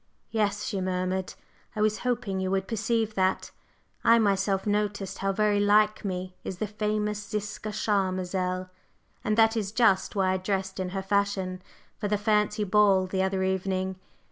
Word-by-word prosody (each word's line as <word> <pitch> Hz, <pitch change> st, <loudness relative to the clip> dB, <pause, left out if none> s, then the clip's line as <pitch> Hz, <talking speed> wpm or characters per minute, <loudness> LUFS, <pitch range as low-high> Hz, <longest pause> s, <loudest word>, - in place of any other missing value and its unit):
"Yes," 210 Hz, -2 st, 0 dB
she 195 Hz, -, -2 dB
murmured, 185 Hz, 0 st, -2 dB, 0.4 s
"I 210 Hz, -, -1 dB
was 215 Hz, 0 st, +2 dB
hoping 235 Hz, -6 st, -1 dB
you 190 Hz, 0 st, -1 dB
would 195 Hz, 0 st, 0 dB
perceive 225 Hz, 0 st, 0 dB
that. 190 Hz, -1 st, 0 dB, 0.5 s
I 230 Hz, -, +6 dB
myself 195 Hz, -2 st, +1 dB
noticed 205 Hz, -2 st, -1 dB
how 195 Hz, 0 st, 0 dB
very 210 Hz, +1 st, +2 dB
like 210 Hz, +1 st, +3 dB
me 185 Hz, -2 st, -4 dB
is 185 Hz, -, -5 dB
the 215 Hz, -, -1 dB
famous 210 Hz, 0 st, -2 dB
Ziska 210 Hz, 0 st, -4 dB
Charmazel, 185 Hz, -3 st, -1 dB, 0.5 s
and 215 Hz, 0 st, 0 dB
that 225 Hz, 0 st, +5 dB
is 205 Hz, -3 st, -2 dB
just 215 Hz, -5 st, +2 dB
why 190 Hz, -2 st, +2 dB
I 190 Hz, -, +1 dB
dressed 190 Hz, 0 st, -2 dB
in 185 Hz, -1 st, -2 dB
her 190 Hz, +1 st, -4 dB
fashion 195 Hz, -2 st, 0 dB, 0.4 s
for 210 Hz, -, -1 dB
the 210 Hz, 0 st, +1 dB
fancy 210 Hz, 0 st, +1 dB
ball 200 Hz, -1 st, +4 dB
the 190 Hz, +1 st, -1 dB
other 190 Hz, 0 st, 0 dB
evening. 190 Hz, 0 st, -1 dB
200 Hz, 165 wpm, -27 LUFS, 190-210 Hz, 0.5 s, I